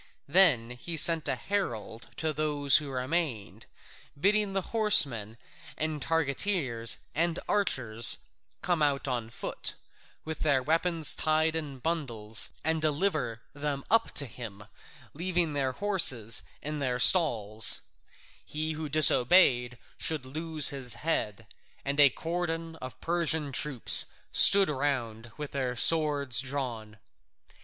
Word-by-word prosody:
Then 140 Hz, -8 st, +3 dB
he 160 Hz, +7 st, -6 dB
sent 160 Hz, 0 st, +3 dB
a 135 Hz, -, -2 dB
herald 120 Hz, -, -5 dB
to 155 Hz, 0 st, -2 dB
those 145 Hz, -2 st, +2 dB
who 150 Hz, -2 st, -4 dB
remained, 130 Hz, -, -5 dB, 0.5 s
bidding 205 Hz, +3 st, 0 dB
the 195 Hz, -1 st, -3 dB
horsemen 130 Hz, -, +3 dB, 0.4 s
and 155 Hz, -1 st, -2 dB
targeteers 140 Hz, -, 0 dB, 0.2 s
and 170 Hz, +2 st, -1 dB
archers 120 Hz, -, +1 dB, 0.5 s
come 175 Hz, -3 st, -1 dB
out 145 Hz, -2 st, 0 dB
on 120 Hz, -4 st, -4 dB
foot, -, -, -3 dB, 0.5 s
with 160 Hz, -1 st, -7 dB
their 140 Hz, -4 st, +1 dB
weapons 165 Hz, +1 st, +1 dB
tied 155 Hz, +1 st, 0 dB
in 150 Hz, -4 st, -6 dB
bundles, 120 Hz, -8 st, 0 dB
and 160 Hz, 0 st, -1 dB
deliver 150 Hz, -, -2 dB
them 145 Hz, -1 st, -5 dB
up 225 Hz, 0 st, +1 dB
to 140 Hz, -, +2 dB
him, 110 Hz, -5 st, -10 dB, 0.5 s
leaving 175 Hz, 0 st, -2 dB
their 135 Hz, -2 st, -2 dB
horses 135 Hz, -, +2 dB, 0.2 s
in 150 Hz, 0 st, -4 dB
their 125 Hz, -3 st, -3 dB
stalls: 115 Hz, -, +4 dB, 0.6 s
he 155 Hz, +1 st, -5 dB
who 155 Hz, -1 st, -6 dB
disobeyed 125 Hz, -4 st, +4 dB, 0.2 s
should 155 Hz, -5 st, -2 dB
lose 155 Hz, +2 st, +2 dB
his 130 Hz, -4 st, -2 dB
head, 115 Hz, -9 st, -4 dB, 0.4 s
and 140 Hz, +1 st, -3 dB
a 145 Hz, -1 st, +7 dB
cordon 165 Hz, +1 st, -5 dB
of 130 Hz, -2 st, -10 dB
Persian 160 Hz, -4 st, -2 dB
troops 135 Hz, -2 st, +4 dB, 0.2 s
stood 200 Hz, -1 st, +6 dB
round 120 Hz, -6 st, -4 dB
with 150 Hz, -1 st, -7 dB
their 130 Hz, -3 st, -4 dB
swords 145 Hz, -4 st, +2 dB
drawn. 125 Hz, -6 st, -7 dB
145 Hz, 125 wpm, -27 LUFS, 125-165 Hz, 0.6 s, a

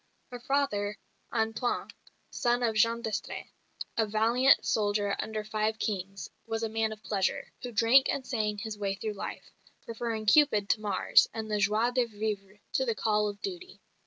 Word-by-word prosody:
Her 245 Hz, -, -6 dB
father, 235 Hz, -6 st, 0 dB, 0.3 s
Antoine, 225 Hz, +2 st, -1 dB, 0.4 s
son 245 Hz, 0 st, +1 dB
of 230 Hz, -2 st, +2 dB
Jean 230 Hz, +2 st, +2 dB
d'Estrées, 220 Hz, -3 st, -4 dB, 0.5 s
a 220 Hz, -1 st, +2 dB
valiant 230 Hz, +5 st, +4 dB
soldier 205 Hz, -1 st, +1 dB
under 215 Hz, -1 st, -3 dB
five 215 Hz, +1 st, -1 dB
kings, 195 Hz, -2 st, -3 dB, 0.2 s
was 225 Hz, 0 st, -2 dB
a 225 Hz, -, -1 dB
man 220 Hz, 0 st, 0 dB
of 215 Hz, 0 st, -9 dB
pleasure, 195 Hz, -3 st, -1 dB
who 245 Hz, -, -5 dB
drank 235 Hz, +4 st, +5 dB
and 265 Hz, -, -1 dB
sang 215 Hz, -4 st, -1 dB
his 210 Hz, 0 st, -6 dB
way 195 Hz, -1 st, -1 dB
through 215 Hz, +2 st, -4 dB
life, 200 Hz, -, -7 dB, 0.3 s
preferring 230 Hz, -1 st, -3 dB
Cupid 210 Hz, -5 st, +4 dB
to 215 Hz, -, +2 dB
Mars 205 Hz, -3 st, +4 dB
and 220 Hz, -1 st, -4 dB
the 210 Hz, -, +1 dB
joie 215 Hz, +4 st, +2 dB
de 250 Hz, -1 st, +2 dB
vivre 210 Hz, -2 st, -4 dB, 0.2 s
to 265 Hz, -, +2 dB
the 230 Hz, -4 st, 0 dB
call 210 Hz, -1 st, +1 dB
of 205 Hz, 0 st, -7 dB
duty. 375 Hz, -1 st, -6 dB
220 Hz, 170 wpm, -29 LUFS, 210-235 Hz, 0.5 s, drank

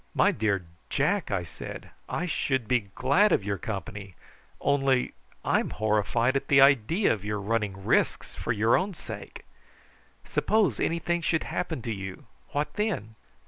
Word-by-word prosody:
"My -, -, +5 dB
dear 100 Hz, -4 st, 0 dB, 0.2 s
Jack," 185 Hz, +7 st, +1 dB
I 100 Hz, -4 st, 0 dB
said, 85 Hz, -, -9 dB, 0.2 s
"I 175 Hz, -, -1 dB
should 135 Hz, -8 st, 0 dB
be 120 Hz, -5 st, +1 dB
glad 180 Hz, +12 st, +4 dB
of -, -, +3 dB
your 100 Hz, -1 st, -2 dB
company, 100 Hz, -2 st, -6 dB, 0.4 s
only 135 Hz, -2 st, +2 dB, 0.3 s
I'm -, -, +2 dB
horrified 110 Hz, +4 st, +1 dB
at 135 Hz, -, -1 dB
the 140 Hz, -, +5 dB
idea 140 Hz, -, +5 dB
of 105 Hz, -3 st, -6 dB
your 105 Hz, 0 st, -2 dB
running 100 Hz, -2 st, -2 dB
risks -, -, +1 dB
for -, -, -3 dB
your 110 Hz, +1 st, +3 dB
own 190 Hz, 0 st, 0 dB
sake. -, -, -8 dB, 0.8 s
Suppose 205 Hz, -, +1 dB
anything 170 Hz, +1 st, 0 dB
should 160 Hz, 0 st, +1 dB
happen 160 Hz, -8 st, -3 dB
to 115 Hz, -, -2 dB
you, 95 Hz, -2 st, -7 dB, 0.3 s
what 145 Hz, +1 st, -1 dB
then?" 185 Hz, -, -2 dB
120 Hz, 150 wpm, -27 LUFS, 105-160 Hz, 0.8 s, My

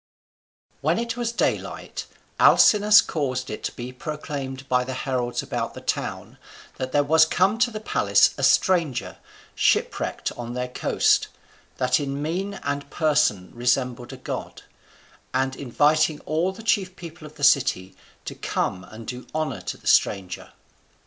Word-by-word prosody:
When -, -, +1 dB
it 235 Hz, 0 st, -2 dB
was 240 Hz, -1 st, -2 dB
daylight, 235 Hz, -, -2 dB, 0.3 s
Alcinous 210 Hz, 0 st, +7 dB
caused 130 Hz, -5 st, -3 dB
it 105 Hz, -, -6 dB
to -, -, -2 dB
be 125 Hz, +1 st, -7 dB
proclaimed 140 Hz, -2 st, -6 dB
by 125 Hz, -1 st, +2 dB
the 130 Hz, +1 st, -5 dB
heralds 125 Hz, -3 st, -2 dB
about -, -, -4 dB
the -, -, -7 dB
town -, -, -4 dB, 0.4 s
that 130 Hz, 0 st, -4 dB
there 145 Hz, -, +3 dB
was 160 Hz, +3 st, +5 dB
come 190 Hz, +7 st, +2 dB
to 245 Hz, -, +3 dB
the 215 Hz, -2 st, -6 dB
palace 215 Hz, -, +3 dB
a -, -, -6 dB
stranger, 165 Hz, -9 st, +2 dB, 0.4 s
shipwrecked -, -, 0 dB
on 120 Hz, 0 st, -7 dB
their 125 Hz, 0 st, -3 dB
coast, -, -, +2 dB, 0.5 s
that 125 Hz, 0 st, +2 dB
in 140 Hz, -1 st, -3 dB
mien 180 Hz, +7 st, -3 dB
and 140 Hz, 0 st, -3 dB
person 145 Hz, -, +1 dB
resembled 125 Hz, 0 st, -1 dB
a -, -, -8 dB
god; -, -, -6 dB, 0.7 s
and 135 Hz, 0 st, 0 dB
inviting 150 Hz, +4 st, +2 dB
all 165 Hz, +4 st, 0 dB
the 195 Hz, +4 st, -11 dB
chief 190 Hz, -4 st, +1 dB
people 170 Hz, -2 st, -10 dB
of 150 Hz, -, -16 dB
the 145 Hz, -, -9 dB
city 125 Hz, -10 st, +3 dB, 0.3 s
to -, -, -5 dB
come 90 Hz, -, -2 dB
and 110 Hz, +1 st, -11 dB
do 125 Hz, +2 st, -7 dB
honour 150 Hz, -11 st, -2 dB
to -, -, -5 dB
the -, -, -23 dB
stranger. 95 Hz, -2 st, +1 dB
140 Hz, 155 wpm, -24 LUFS, 125-165 Hz, 0.7 s, Alcinous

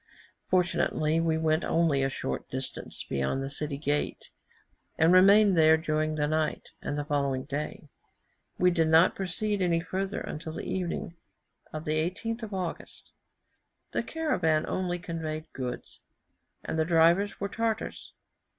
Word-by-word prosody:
Fortunately 170 Hz, -3 st, +1 dB
we 165 Hz, -1 st, +1 dB
went 160 Hz, 0 st, +1 dB
only 160 Hz, -5 st, +2 dB
a 135 Hz, -, +1 dB
short 65 Hz, -, -4 dB
distance -, -, -5 dB
beyond 70 Hz, -, -1 dB
the 135 Hz, -, -4 dB
city 145 Hz, 0 st, -3 dB
gate, 145 Hz, 0 st, -2 dB, 0.7 s
and 160 Hz, +2 st, +5 dB
remained 200 Hz, +2 st, +7 dB
there 160 Hz, -1 st, +6 dB
during 155 Hz, -1 st, -1 dB
the 150 Hz, -1 st, +1 dB
night 155 Hz, 0 st, -1 dB
and 145 Hz, -, -3 dB
the 145 Hz, -, -2 dB
following 140 Hz, -3 st, 0 dB
day. 150 Hz, +2 st, -5 dB, 0.7 s
We 180 Hz, 0 st, +4 dB
did 165 Hz, -2 st, +2 dB
not 160 Hz, +3 st, +6 dB
proceed 195 Hz, +2 st, -2 dB
any 170 Hz, -2 st, +2 dB
further 190 Hz, +3 st, -3 dB
until 155 Hz, +1 st, -6 dB
the -, -, -6 dB
evening 175 Hz, -2 st, -3 dB, 0.5 s
of 155 Hz, 0 st, -6 dB
the 150 Hz, -, -1 dB
18th 215 Hz, +8 st, -2 dB
of 220 Hz, -2 st, -6 dB
August. 185 Hz, -3 st, -6 dB, 0.8 s
The -, -, 0 dB
caravan 165 Hz, -, 0 dB
only 180 Hz, -1 st, -1 dB
conveyed 160 Hz, -3 st, -5 dB
goods, 125 Hz, -2 st, -6 dB, 0.6 s
and 160 Hz, -, -2 dB
the -, -, +4 dB
drivers 170 Hz, +4 st, +3 dB
were 200 Hz, -, -1 dB
Tartars. 225 Hz, +1 st, -3 dB
160 Hz, 145 wpm, -28 LUFS, 155-185 Hz, 0.8 s, remained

